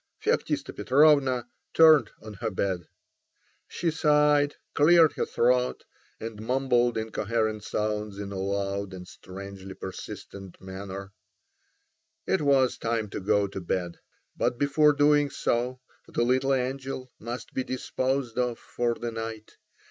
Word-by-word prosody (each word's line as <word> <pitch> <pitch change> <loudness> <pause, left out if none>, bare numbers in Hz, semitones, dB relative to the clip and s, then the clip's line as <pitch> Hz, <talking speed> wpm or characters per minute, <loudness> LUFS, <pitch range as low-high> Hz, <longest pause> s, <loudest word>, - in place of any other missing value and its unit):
Feoktista - - -1
Petrovna 135 -3 +4 0.3
turned 155 -8 +7
on 110 -1 -8
her 110 +3 -3
bed. 95 -4 -2 0.8
She 170 -1 -1
sighed, 150 -2 +3 0.2
cleared 160 0 +6
her - - -2
throat, 125 +1 +1 0.4
and 110 -1 -7
mumbled 125 0 +1
incoherent 110 0 -1
sounds 105 -1 -2
in 100 -1 -6
a 95 - -4
loud 100 0 -2
and 90 -1 -9
strangely 95 +1 -9
persistent 95 0 -8
manner. 95 +1 -7 1.1
It - - +1
was 135 -3 +3
time 115 -3 -2
to - - -4
go 100 +1 +2
to 95 -1 -6
bed. 85 0 -3 0.4
But 120 - 0
before 145 +2 +4
doing 145 0 +4
so 125 0 -1 0.3
the - - 0
little 130 +3 +2
angel 130 0 -4
must 120 +1 -7
be 130 - -1
disposed 130 -1 -2
of 125 -2 0
for 120 -1 -2
the 120 0 -4
night. 115 -1 -6
120 Hz, 130 wpm, -27 LUFS, 100-135 Hz, 1.1 s, turned